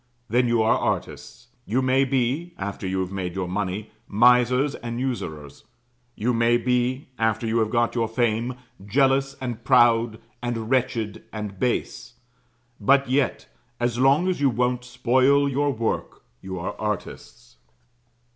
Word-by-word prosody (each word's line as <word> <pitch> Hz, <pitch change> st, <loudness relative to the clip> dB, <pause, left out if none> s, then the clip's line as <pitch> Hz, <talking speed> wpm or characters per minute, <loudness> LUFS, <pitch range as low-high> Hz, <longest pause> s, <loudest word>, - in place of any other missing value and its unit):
Then 125 Hz, +3 st, +2 dB
you 120 Hz, -1 st, +2 dB
are 110 Hz, -, +3 dB
artists; -, -, -4 dB
you 125 Hz, +5 st, 0 dB
may 130 Hz, +1 st, +3 dB
be, 135 Hz, +6 st, -1 dB
after 95 Hz, -1 st, -5 dB
you 95 Hz, 0 st, -1 dB
have 95 Hz, 0 st, -4 dB
made 95 Hz, -2 st, -4 dB
your 95 Hz, -2 st, -2 dB
money, 100 Hz, +2 st, -3 dB, 0.2 s
misers 125 Hz, +5 st, +4 dB
and 120 Hz, 0 st, -5 dB
usurers; 80 Hz, -, -5 dB, 0.5 s
you 120 Hz, +4 st, 0 dB
may 115 Hz, +1 st, +3 dB
be, 125 Hz, +2 st, -1 dB
after 110 Hz, 0 st, +1 dB
you 115 Hz, +1 st, +1 dB
have 110 Hz, -1 st, +1 dB
got 120 Hz, 0 st, +1 dB
your 115 Hz, -2 st, 0 dB
fame, 115 Hz, +1 st, 0 dB, 0.3 s
jealous, 135 Hz, +5 st, +2 dB
and 120 Hz, -3 st, -5 dB
proud, 120 Hz, -3 st, +4 dB, 0.2 s
and 120 Hz, -1 st, -3 dB
wretched, 120 Hz, -5 st, -1 dB
and 105 Hz, -3 st, -6 dB
base: 125 Hz, 0 st, -2 dB, 0.6 s
but 140 Hz, -1 st, +3 dB
yet, 135 Hz, -1 st, 0 dB, 0.3 s
as 120 Hz, 0 st, -1 dB
long 140 Hz, +7 st, +4 dB
as 185 Hz, -6 st, -1 dB
you 140 Hz, -, +4 dB
won't 125 Hz, +1 st, 0 dB
spoil 130 Hz, +3 st, +2 dB
your 140 Hz, +1 st, 0 dB
work, 115 Hz, -4 st, -3 dB, 0.2 s
you 95 Hz, -1 st, -6 dB
are 85 Hz, -, -4 dB
artists. -, -, -6 dB
120 Hz, 145 wpm, -24 LUFS, 110-130 Hz, 0.6 s, misers